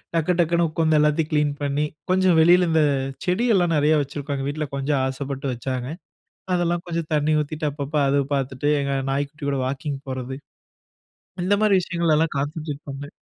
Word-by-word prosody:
டக்கு 165 +2 +2
டக்குன்னு 170 0 +3
உட்கார்ந்து 160 -1 +2
எல்லாத்தையும் 150 +1 +2
கிளீன் 150 -1 +2
பண்ணி, 145 +1 0 0.3
கொஞ்சம் 185 -2 +4
வெளியில 175 +2 +5
இந்த 160 -1 +4 0.4
செடி 185 +7 +1
எல்லாம் 175 -3 +2
நெறையா 150 +1 +3
வச்சிருக்கோம். 140 +1 -4
எங்க 135 0 -3
வீட்ல 150 +1 -3
கொஞ்சம் 140 0 0
ஆசைப்பட்டு 135 0 -4
வச்சாங்க, 125 +1 -4 0.7
அதெல்லாம் 175 -1 0
கொஞ்சம் 165 -2 -3
தண்ணி 150 +1 +2
ஊத்திட்டு 150 +1 -3
அப்பப்போ 145 +1 -2
அது 140 +1 +3 0.2
பார்த்துட்டு, 135 +1 -1
எங்க 140 0 -2 0.2
நாய்க்குட்டி 145 +2 -3
கூட 140 -1 -1
வாக்கிங் 140 +2 -3
போறது, 130 0 -4 1.1
இந்த 205 +3 +3
மாரி 210 -2 +4
விஷயங்கள்ல 170 -3 +1
கான்சன்ட்ரேட் 150 +1 -4
பண்ணேன். 140 +1 -7
150 Hz, 160 wpm, -23 LUFS, 140-165 Hz, 1.1 s, வெளியில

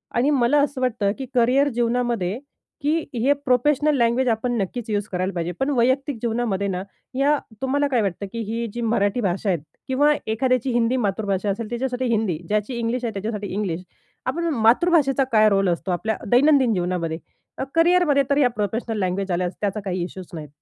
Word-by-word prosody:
आणि 255 +5 +3
मला 280 +1 +3
असं 280 -2 -1
वाटतं 225 -5 +1
की 270 - -5
करिअर 255 +4 +4
जीवनामध्ये 235 -4 0 0.4
की 295 +2 +1 0.2
हे 250 +4 +3
प्रोफेशनल 295 +4 +3
लँग्वेज 235 +2 +2
आपण 225 +2 0
नक्कीच 230 +4 -4
यूज 205 -1 -1
करायला 185 0 -2
पाहिजे. 170 0 -2
पण 270 - +1
वैयक्तिक 260 +2 +1
जीवनामध्ये 225 -4 -1
ना 185 -1 -2 0.3
या 285 +3 +3 0.2
तुम्हाला 285 +2 +1
काय 250 -4 +1
वाटतं 200 -1 -2
की 230 - -4
ही 230 +1 -2
जी 240 - -4
मराठी 220 0 +1
भाषा 195 0 -1
आहे. 180 - +2 0.3
किंवा 290 +3 +3 0.2
एखाद्याची 255 +3 +1
हिंदी 240 +1 +2
मातृभाषा 200 0 -1
असेल 215 +2 -3
त्याच्यासाठी 250 +1 -2
हिंदी. 220 -8 0
ज्याची 210 +4 -1
इंग्लिश 235 +2 -1
आहे 225 - -2
त्याच्यासाठी 205 0 -4
इंग्लिश. 185 -4 -2 0.4
आपण 335 +7 -1 0.2
मातृभाषेचा 275 -1 +4
काय 215 -1 +5
रोल 195 -1 +2
असतो 175 +2 -2
आपल्या 215 +5 -1
दैनंदिन 260 -2 +5
जीवनामध्ये? 175 -3 -1 0.4
अ, - - -2
करिअरमध्ये 330 -4 +4
तर 280 - +2
या 260 -4 +4
प्रोफेशनल 220 +2 -2
लँग्वेज 190 +1 -1
आल्यास 180 +1 -1
त्याचा 205 +1 -1
काही 180 -2 -2
इश्यूच 185 0 -8
नाहीत. 155 -3 -6
230 Hz, 180 wpm, -23 LUFS, 200-260 Hz, 0.4 s, काय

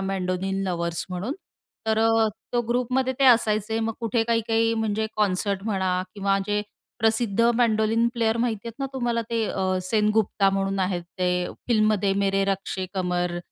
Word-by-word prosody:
Mandolin 190 0 -2
lovers 170 -1 -2
म्हणून. 190 +9 -3 0.5
तर 220 0 +2
अ, 225 0 +3 0.2
तो 240 - +2
ग्रुपमध्ये 250 +2 +1
ते 275 - +3
असायचे. 220 -2 +3
मग 225 0 -1
कुठे 230 0 +1
काही, 230 0 +2
काही 225 0 +2
म्हणजे 220 -1 -1
कॉन्सर्ट 200 -1 0
म्हणा 190 -4 0
किंवा 195 -1 +1
जे 210 0 0 0.4
प्रसिद्ध 225 -1 +1 0.2
मेंडोलिन 225 -1 +2
प्लेयर 225 -1 +1
माहिती 230 -2 -1
आहेत 230 - -11
ना 275 - -1
तुम्हाला 240 -3 -1
ते 230 -1 +1
अ, 185 -1 -1
सेनगुप्ता 210 0 +2
म्हणून 195 0 -1
आहेत. 180 -2 -1 0.2
ते 180 0 +1 0.2
फिल्ममध्ये 215 -3 +2
मेरे 195 0 +2
रश्के 195 -1 -2
कमर 180 -1 -1
210 Hz, 155 wpm, -25 LUFS, 190-225 Hz, 0.5 s, अ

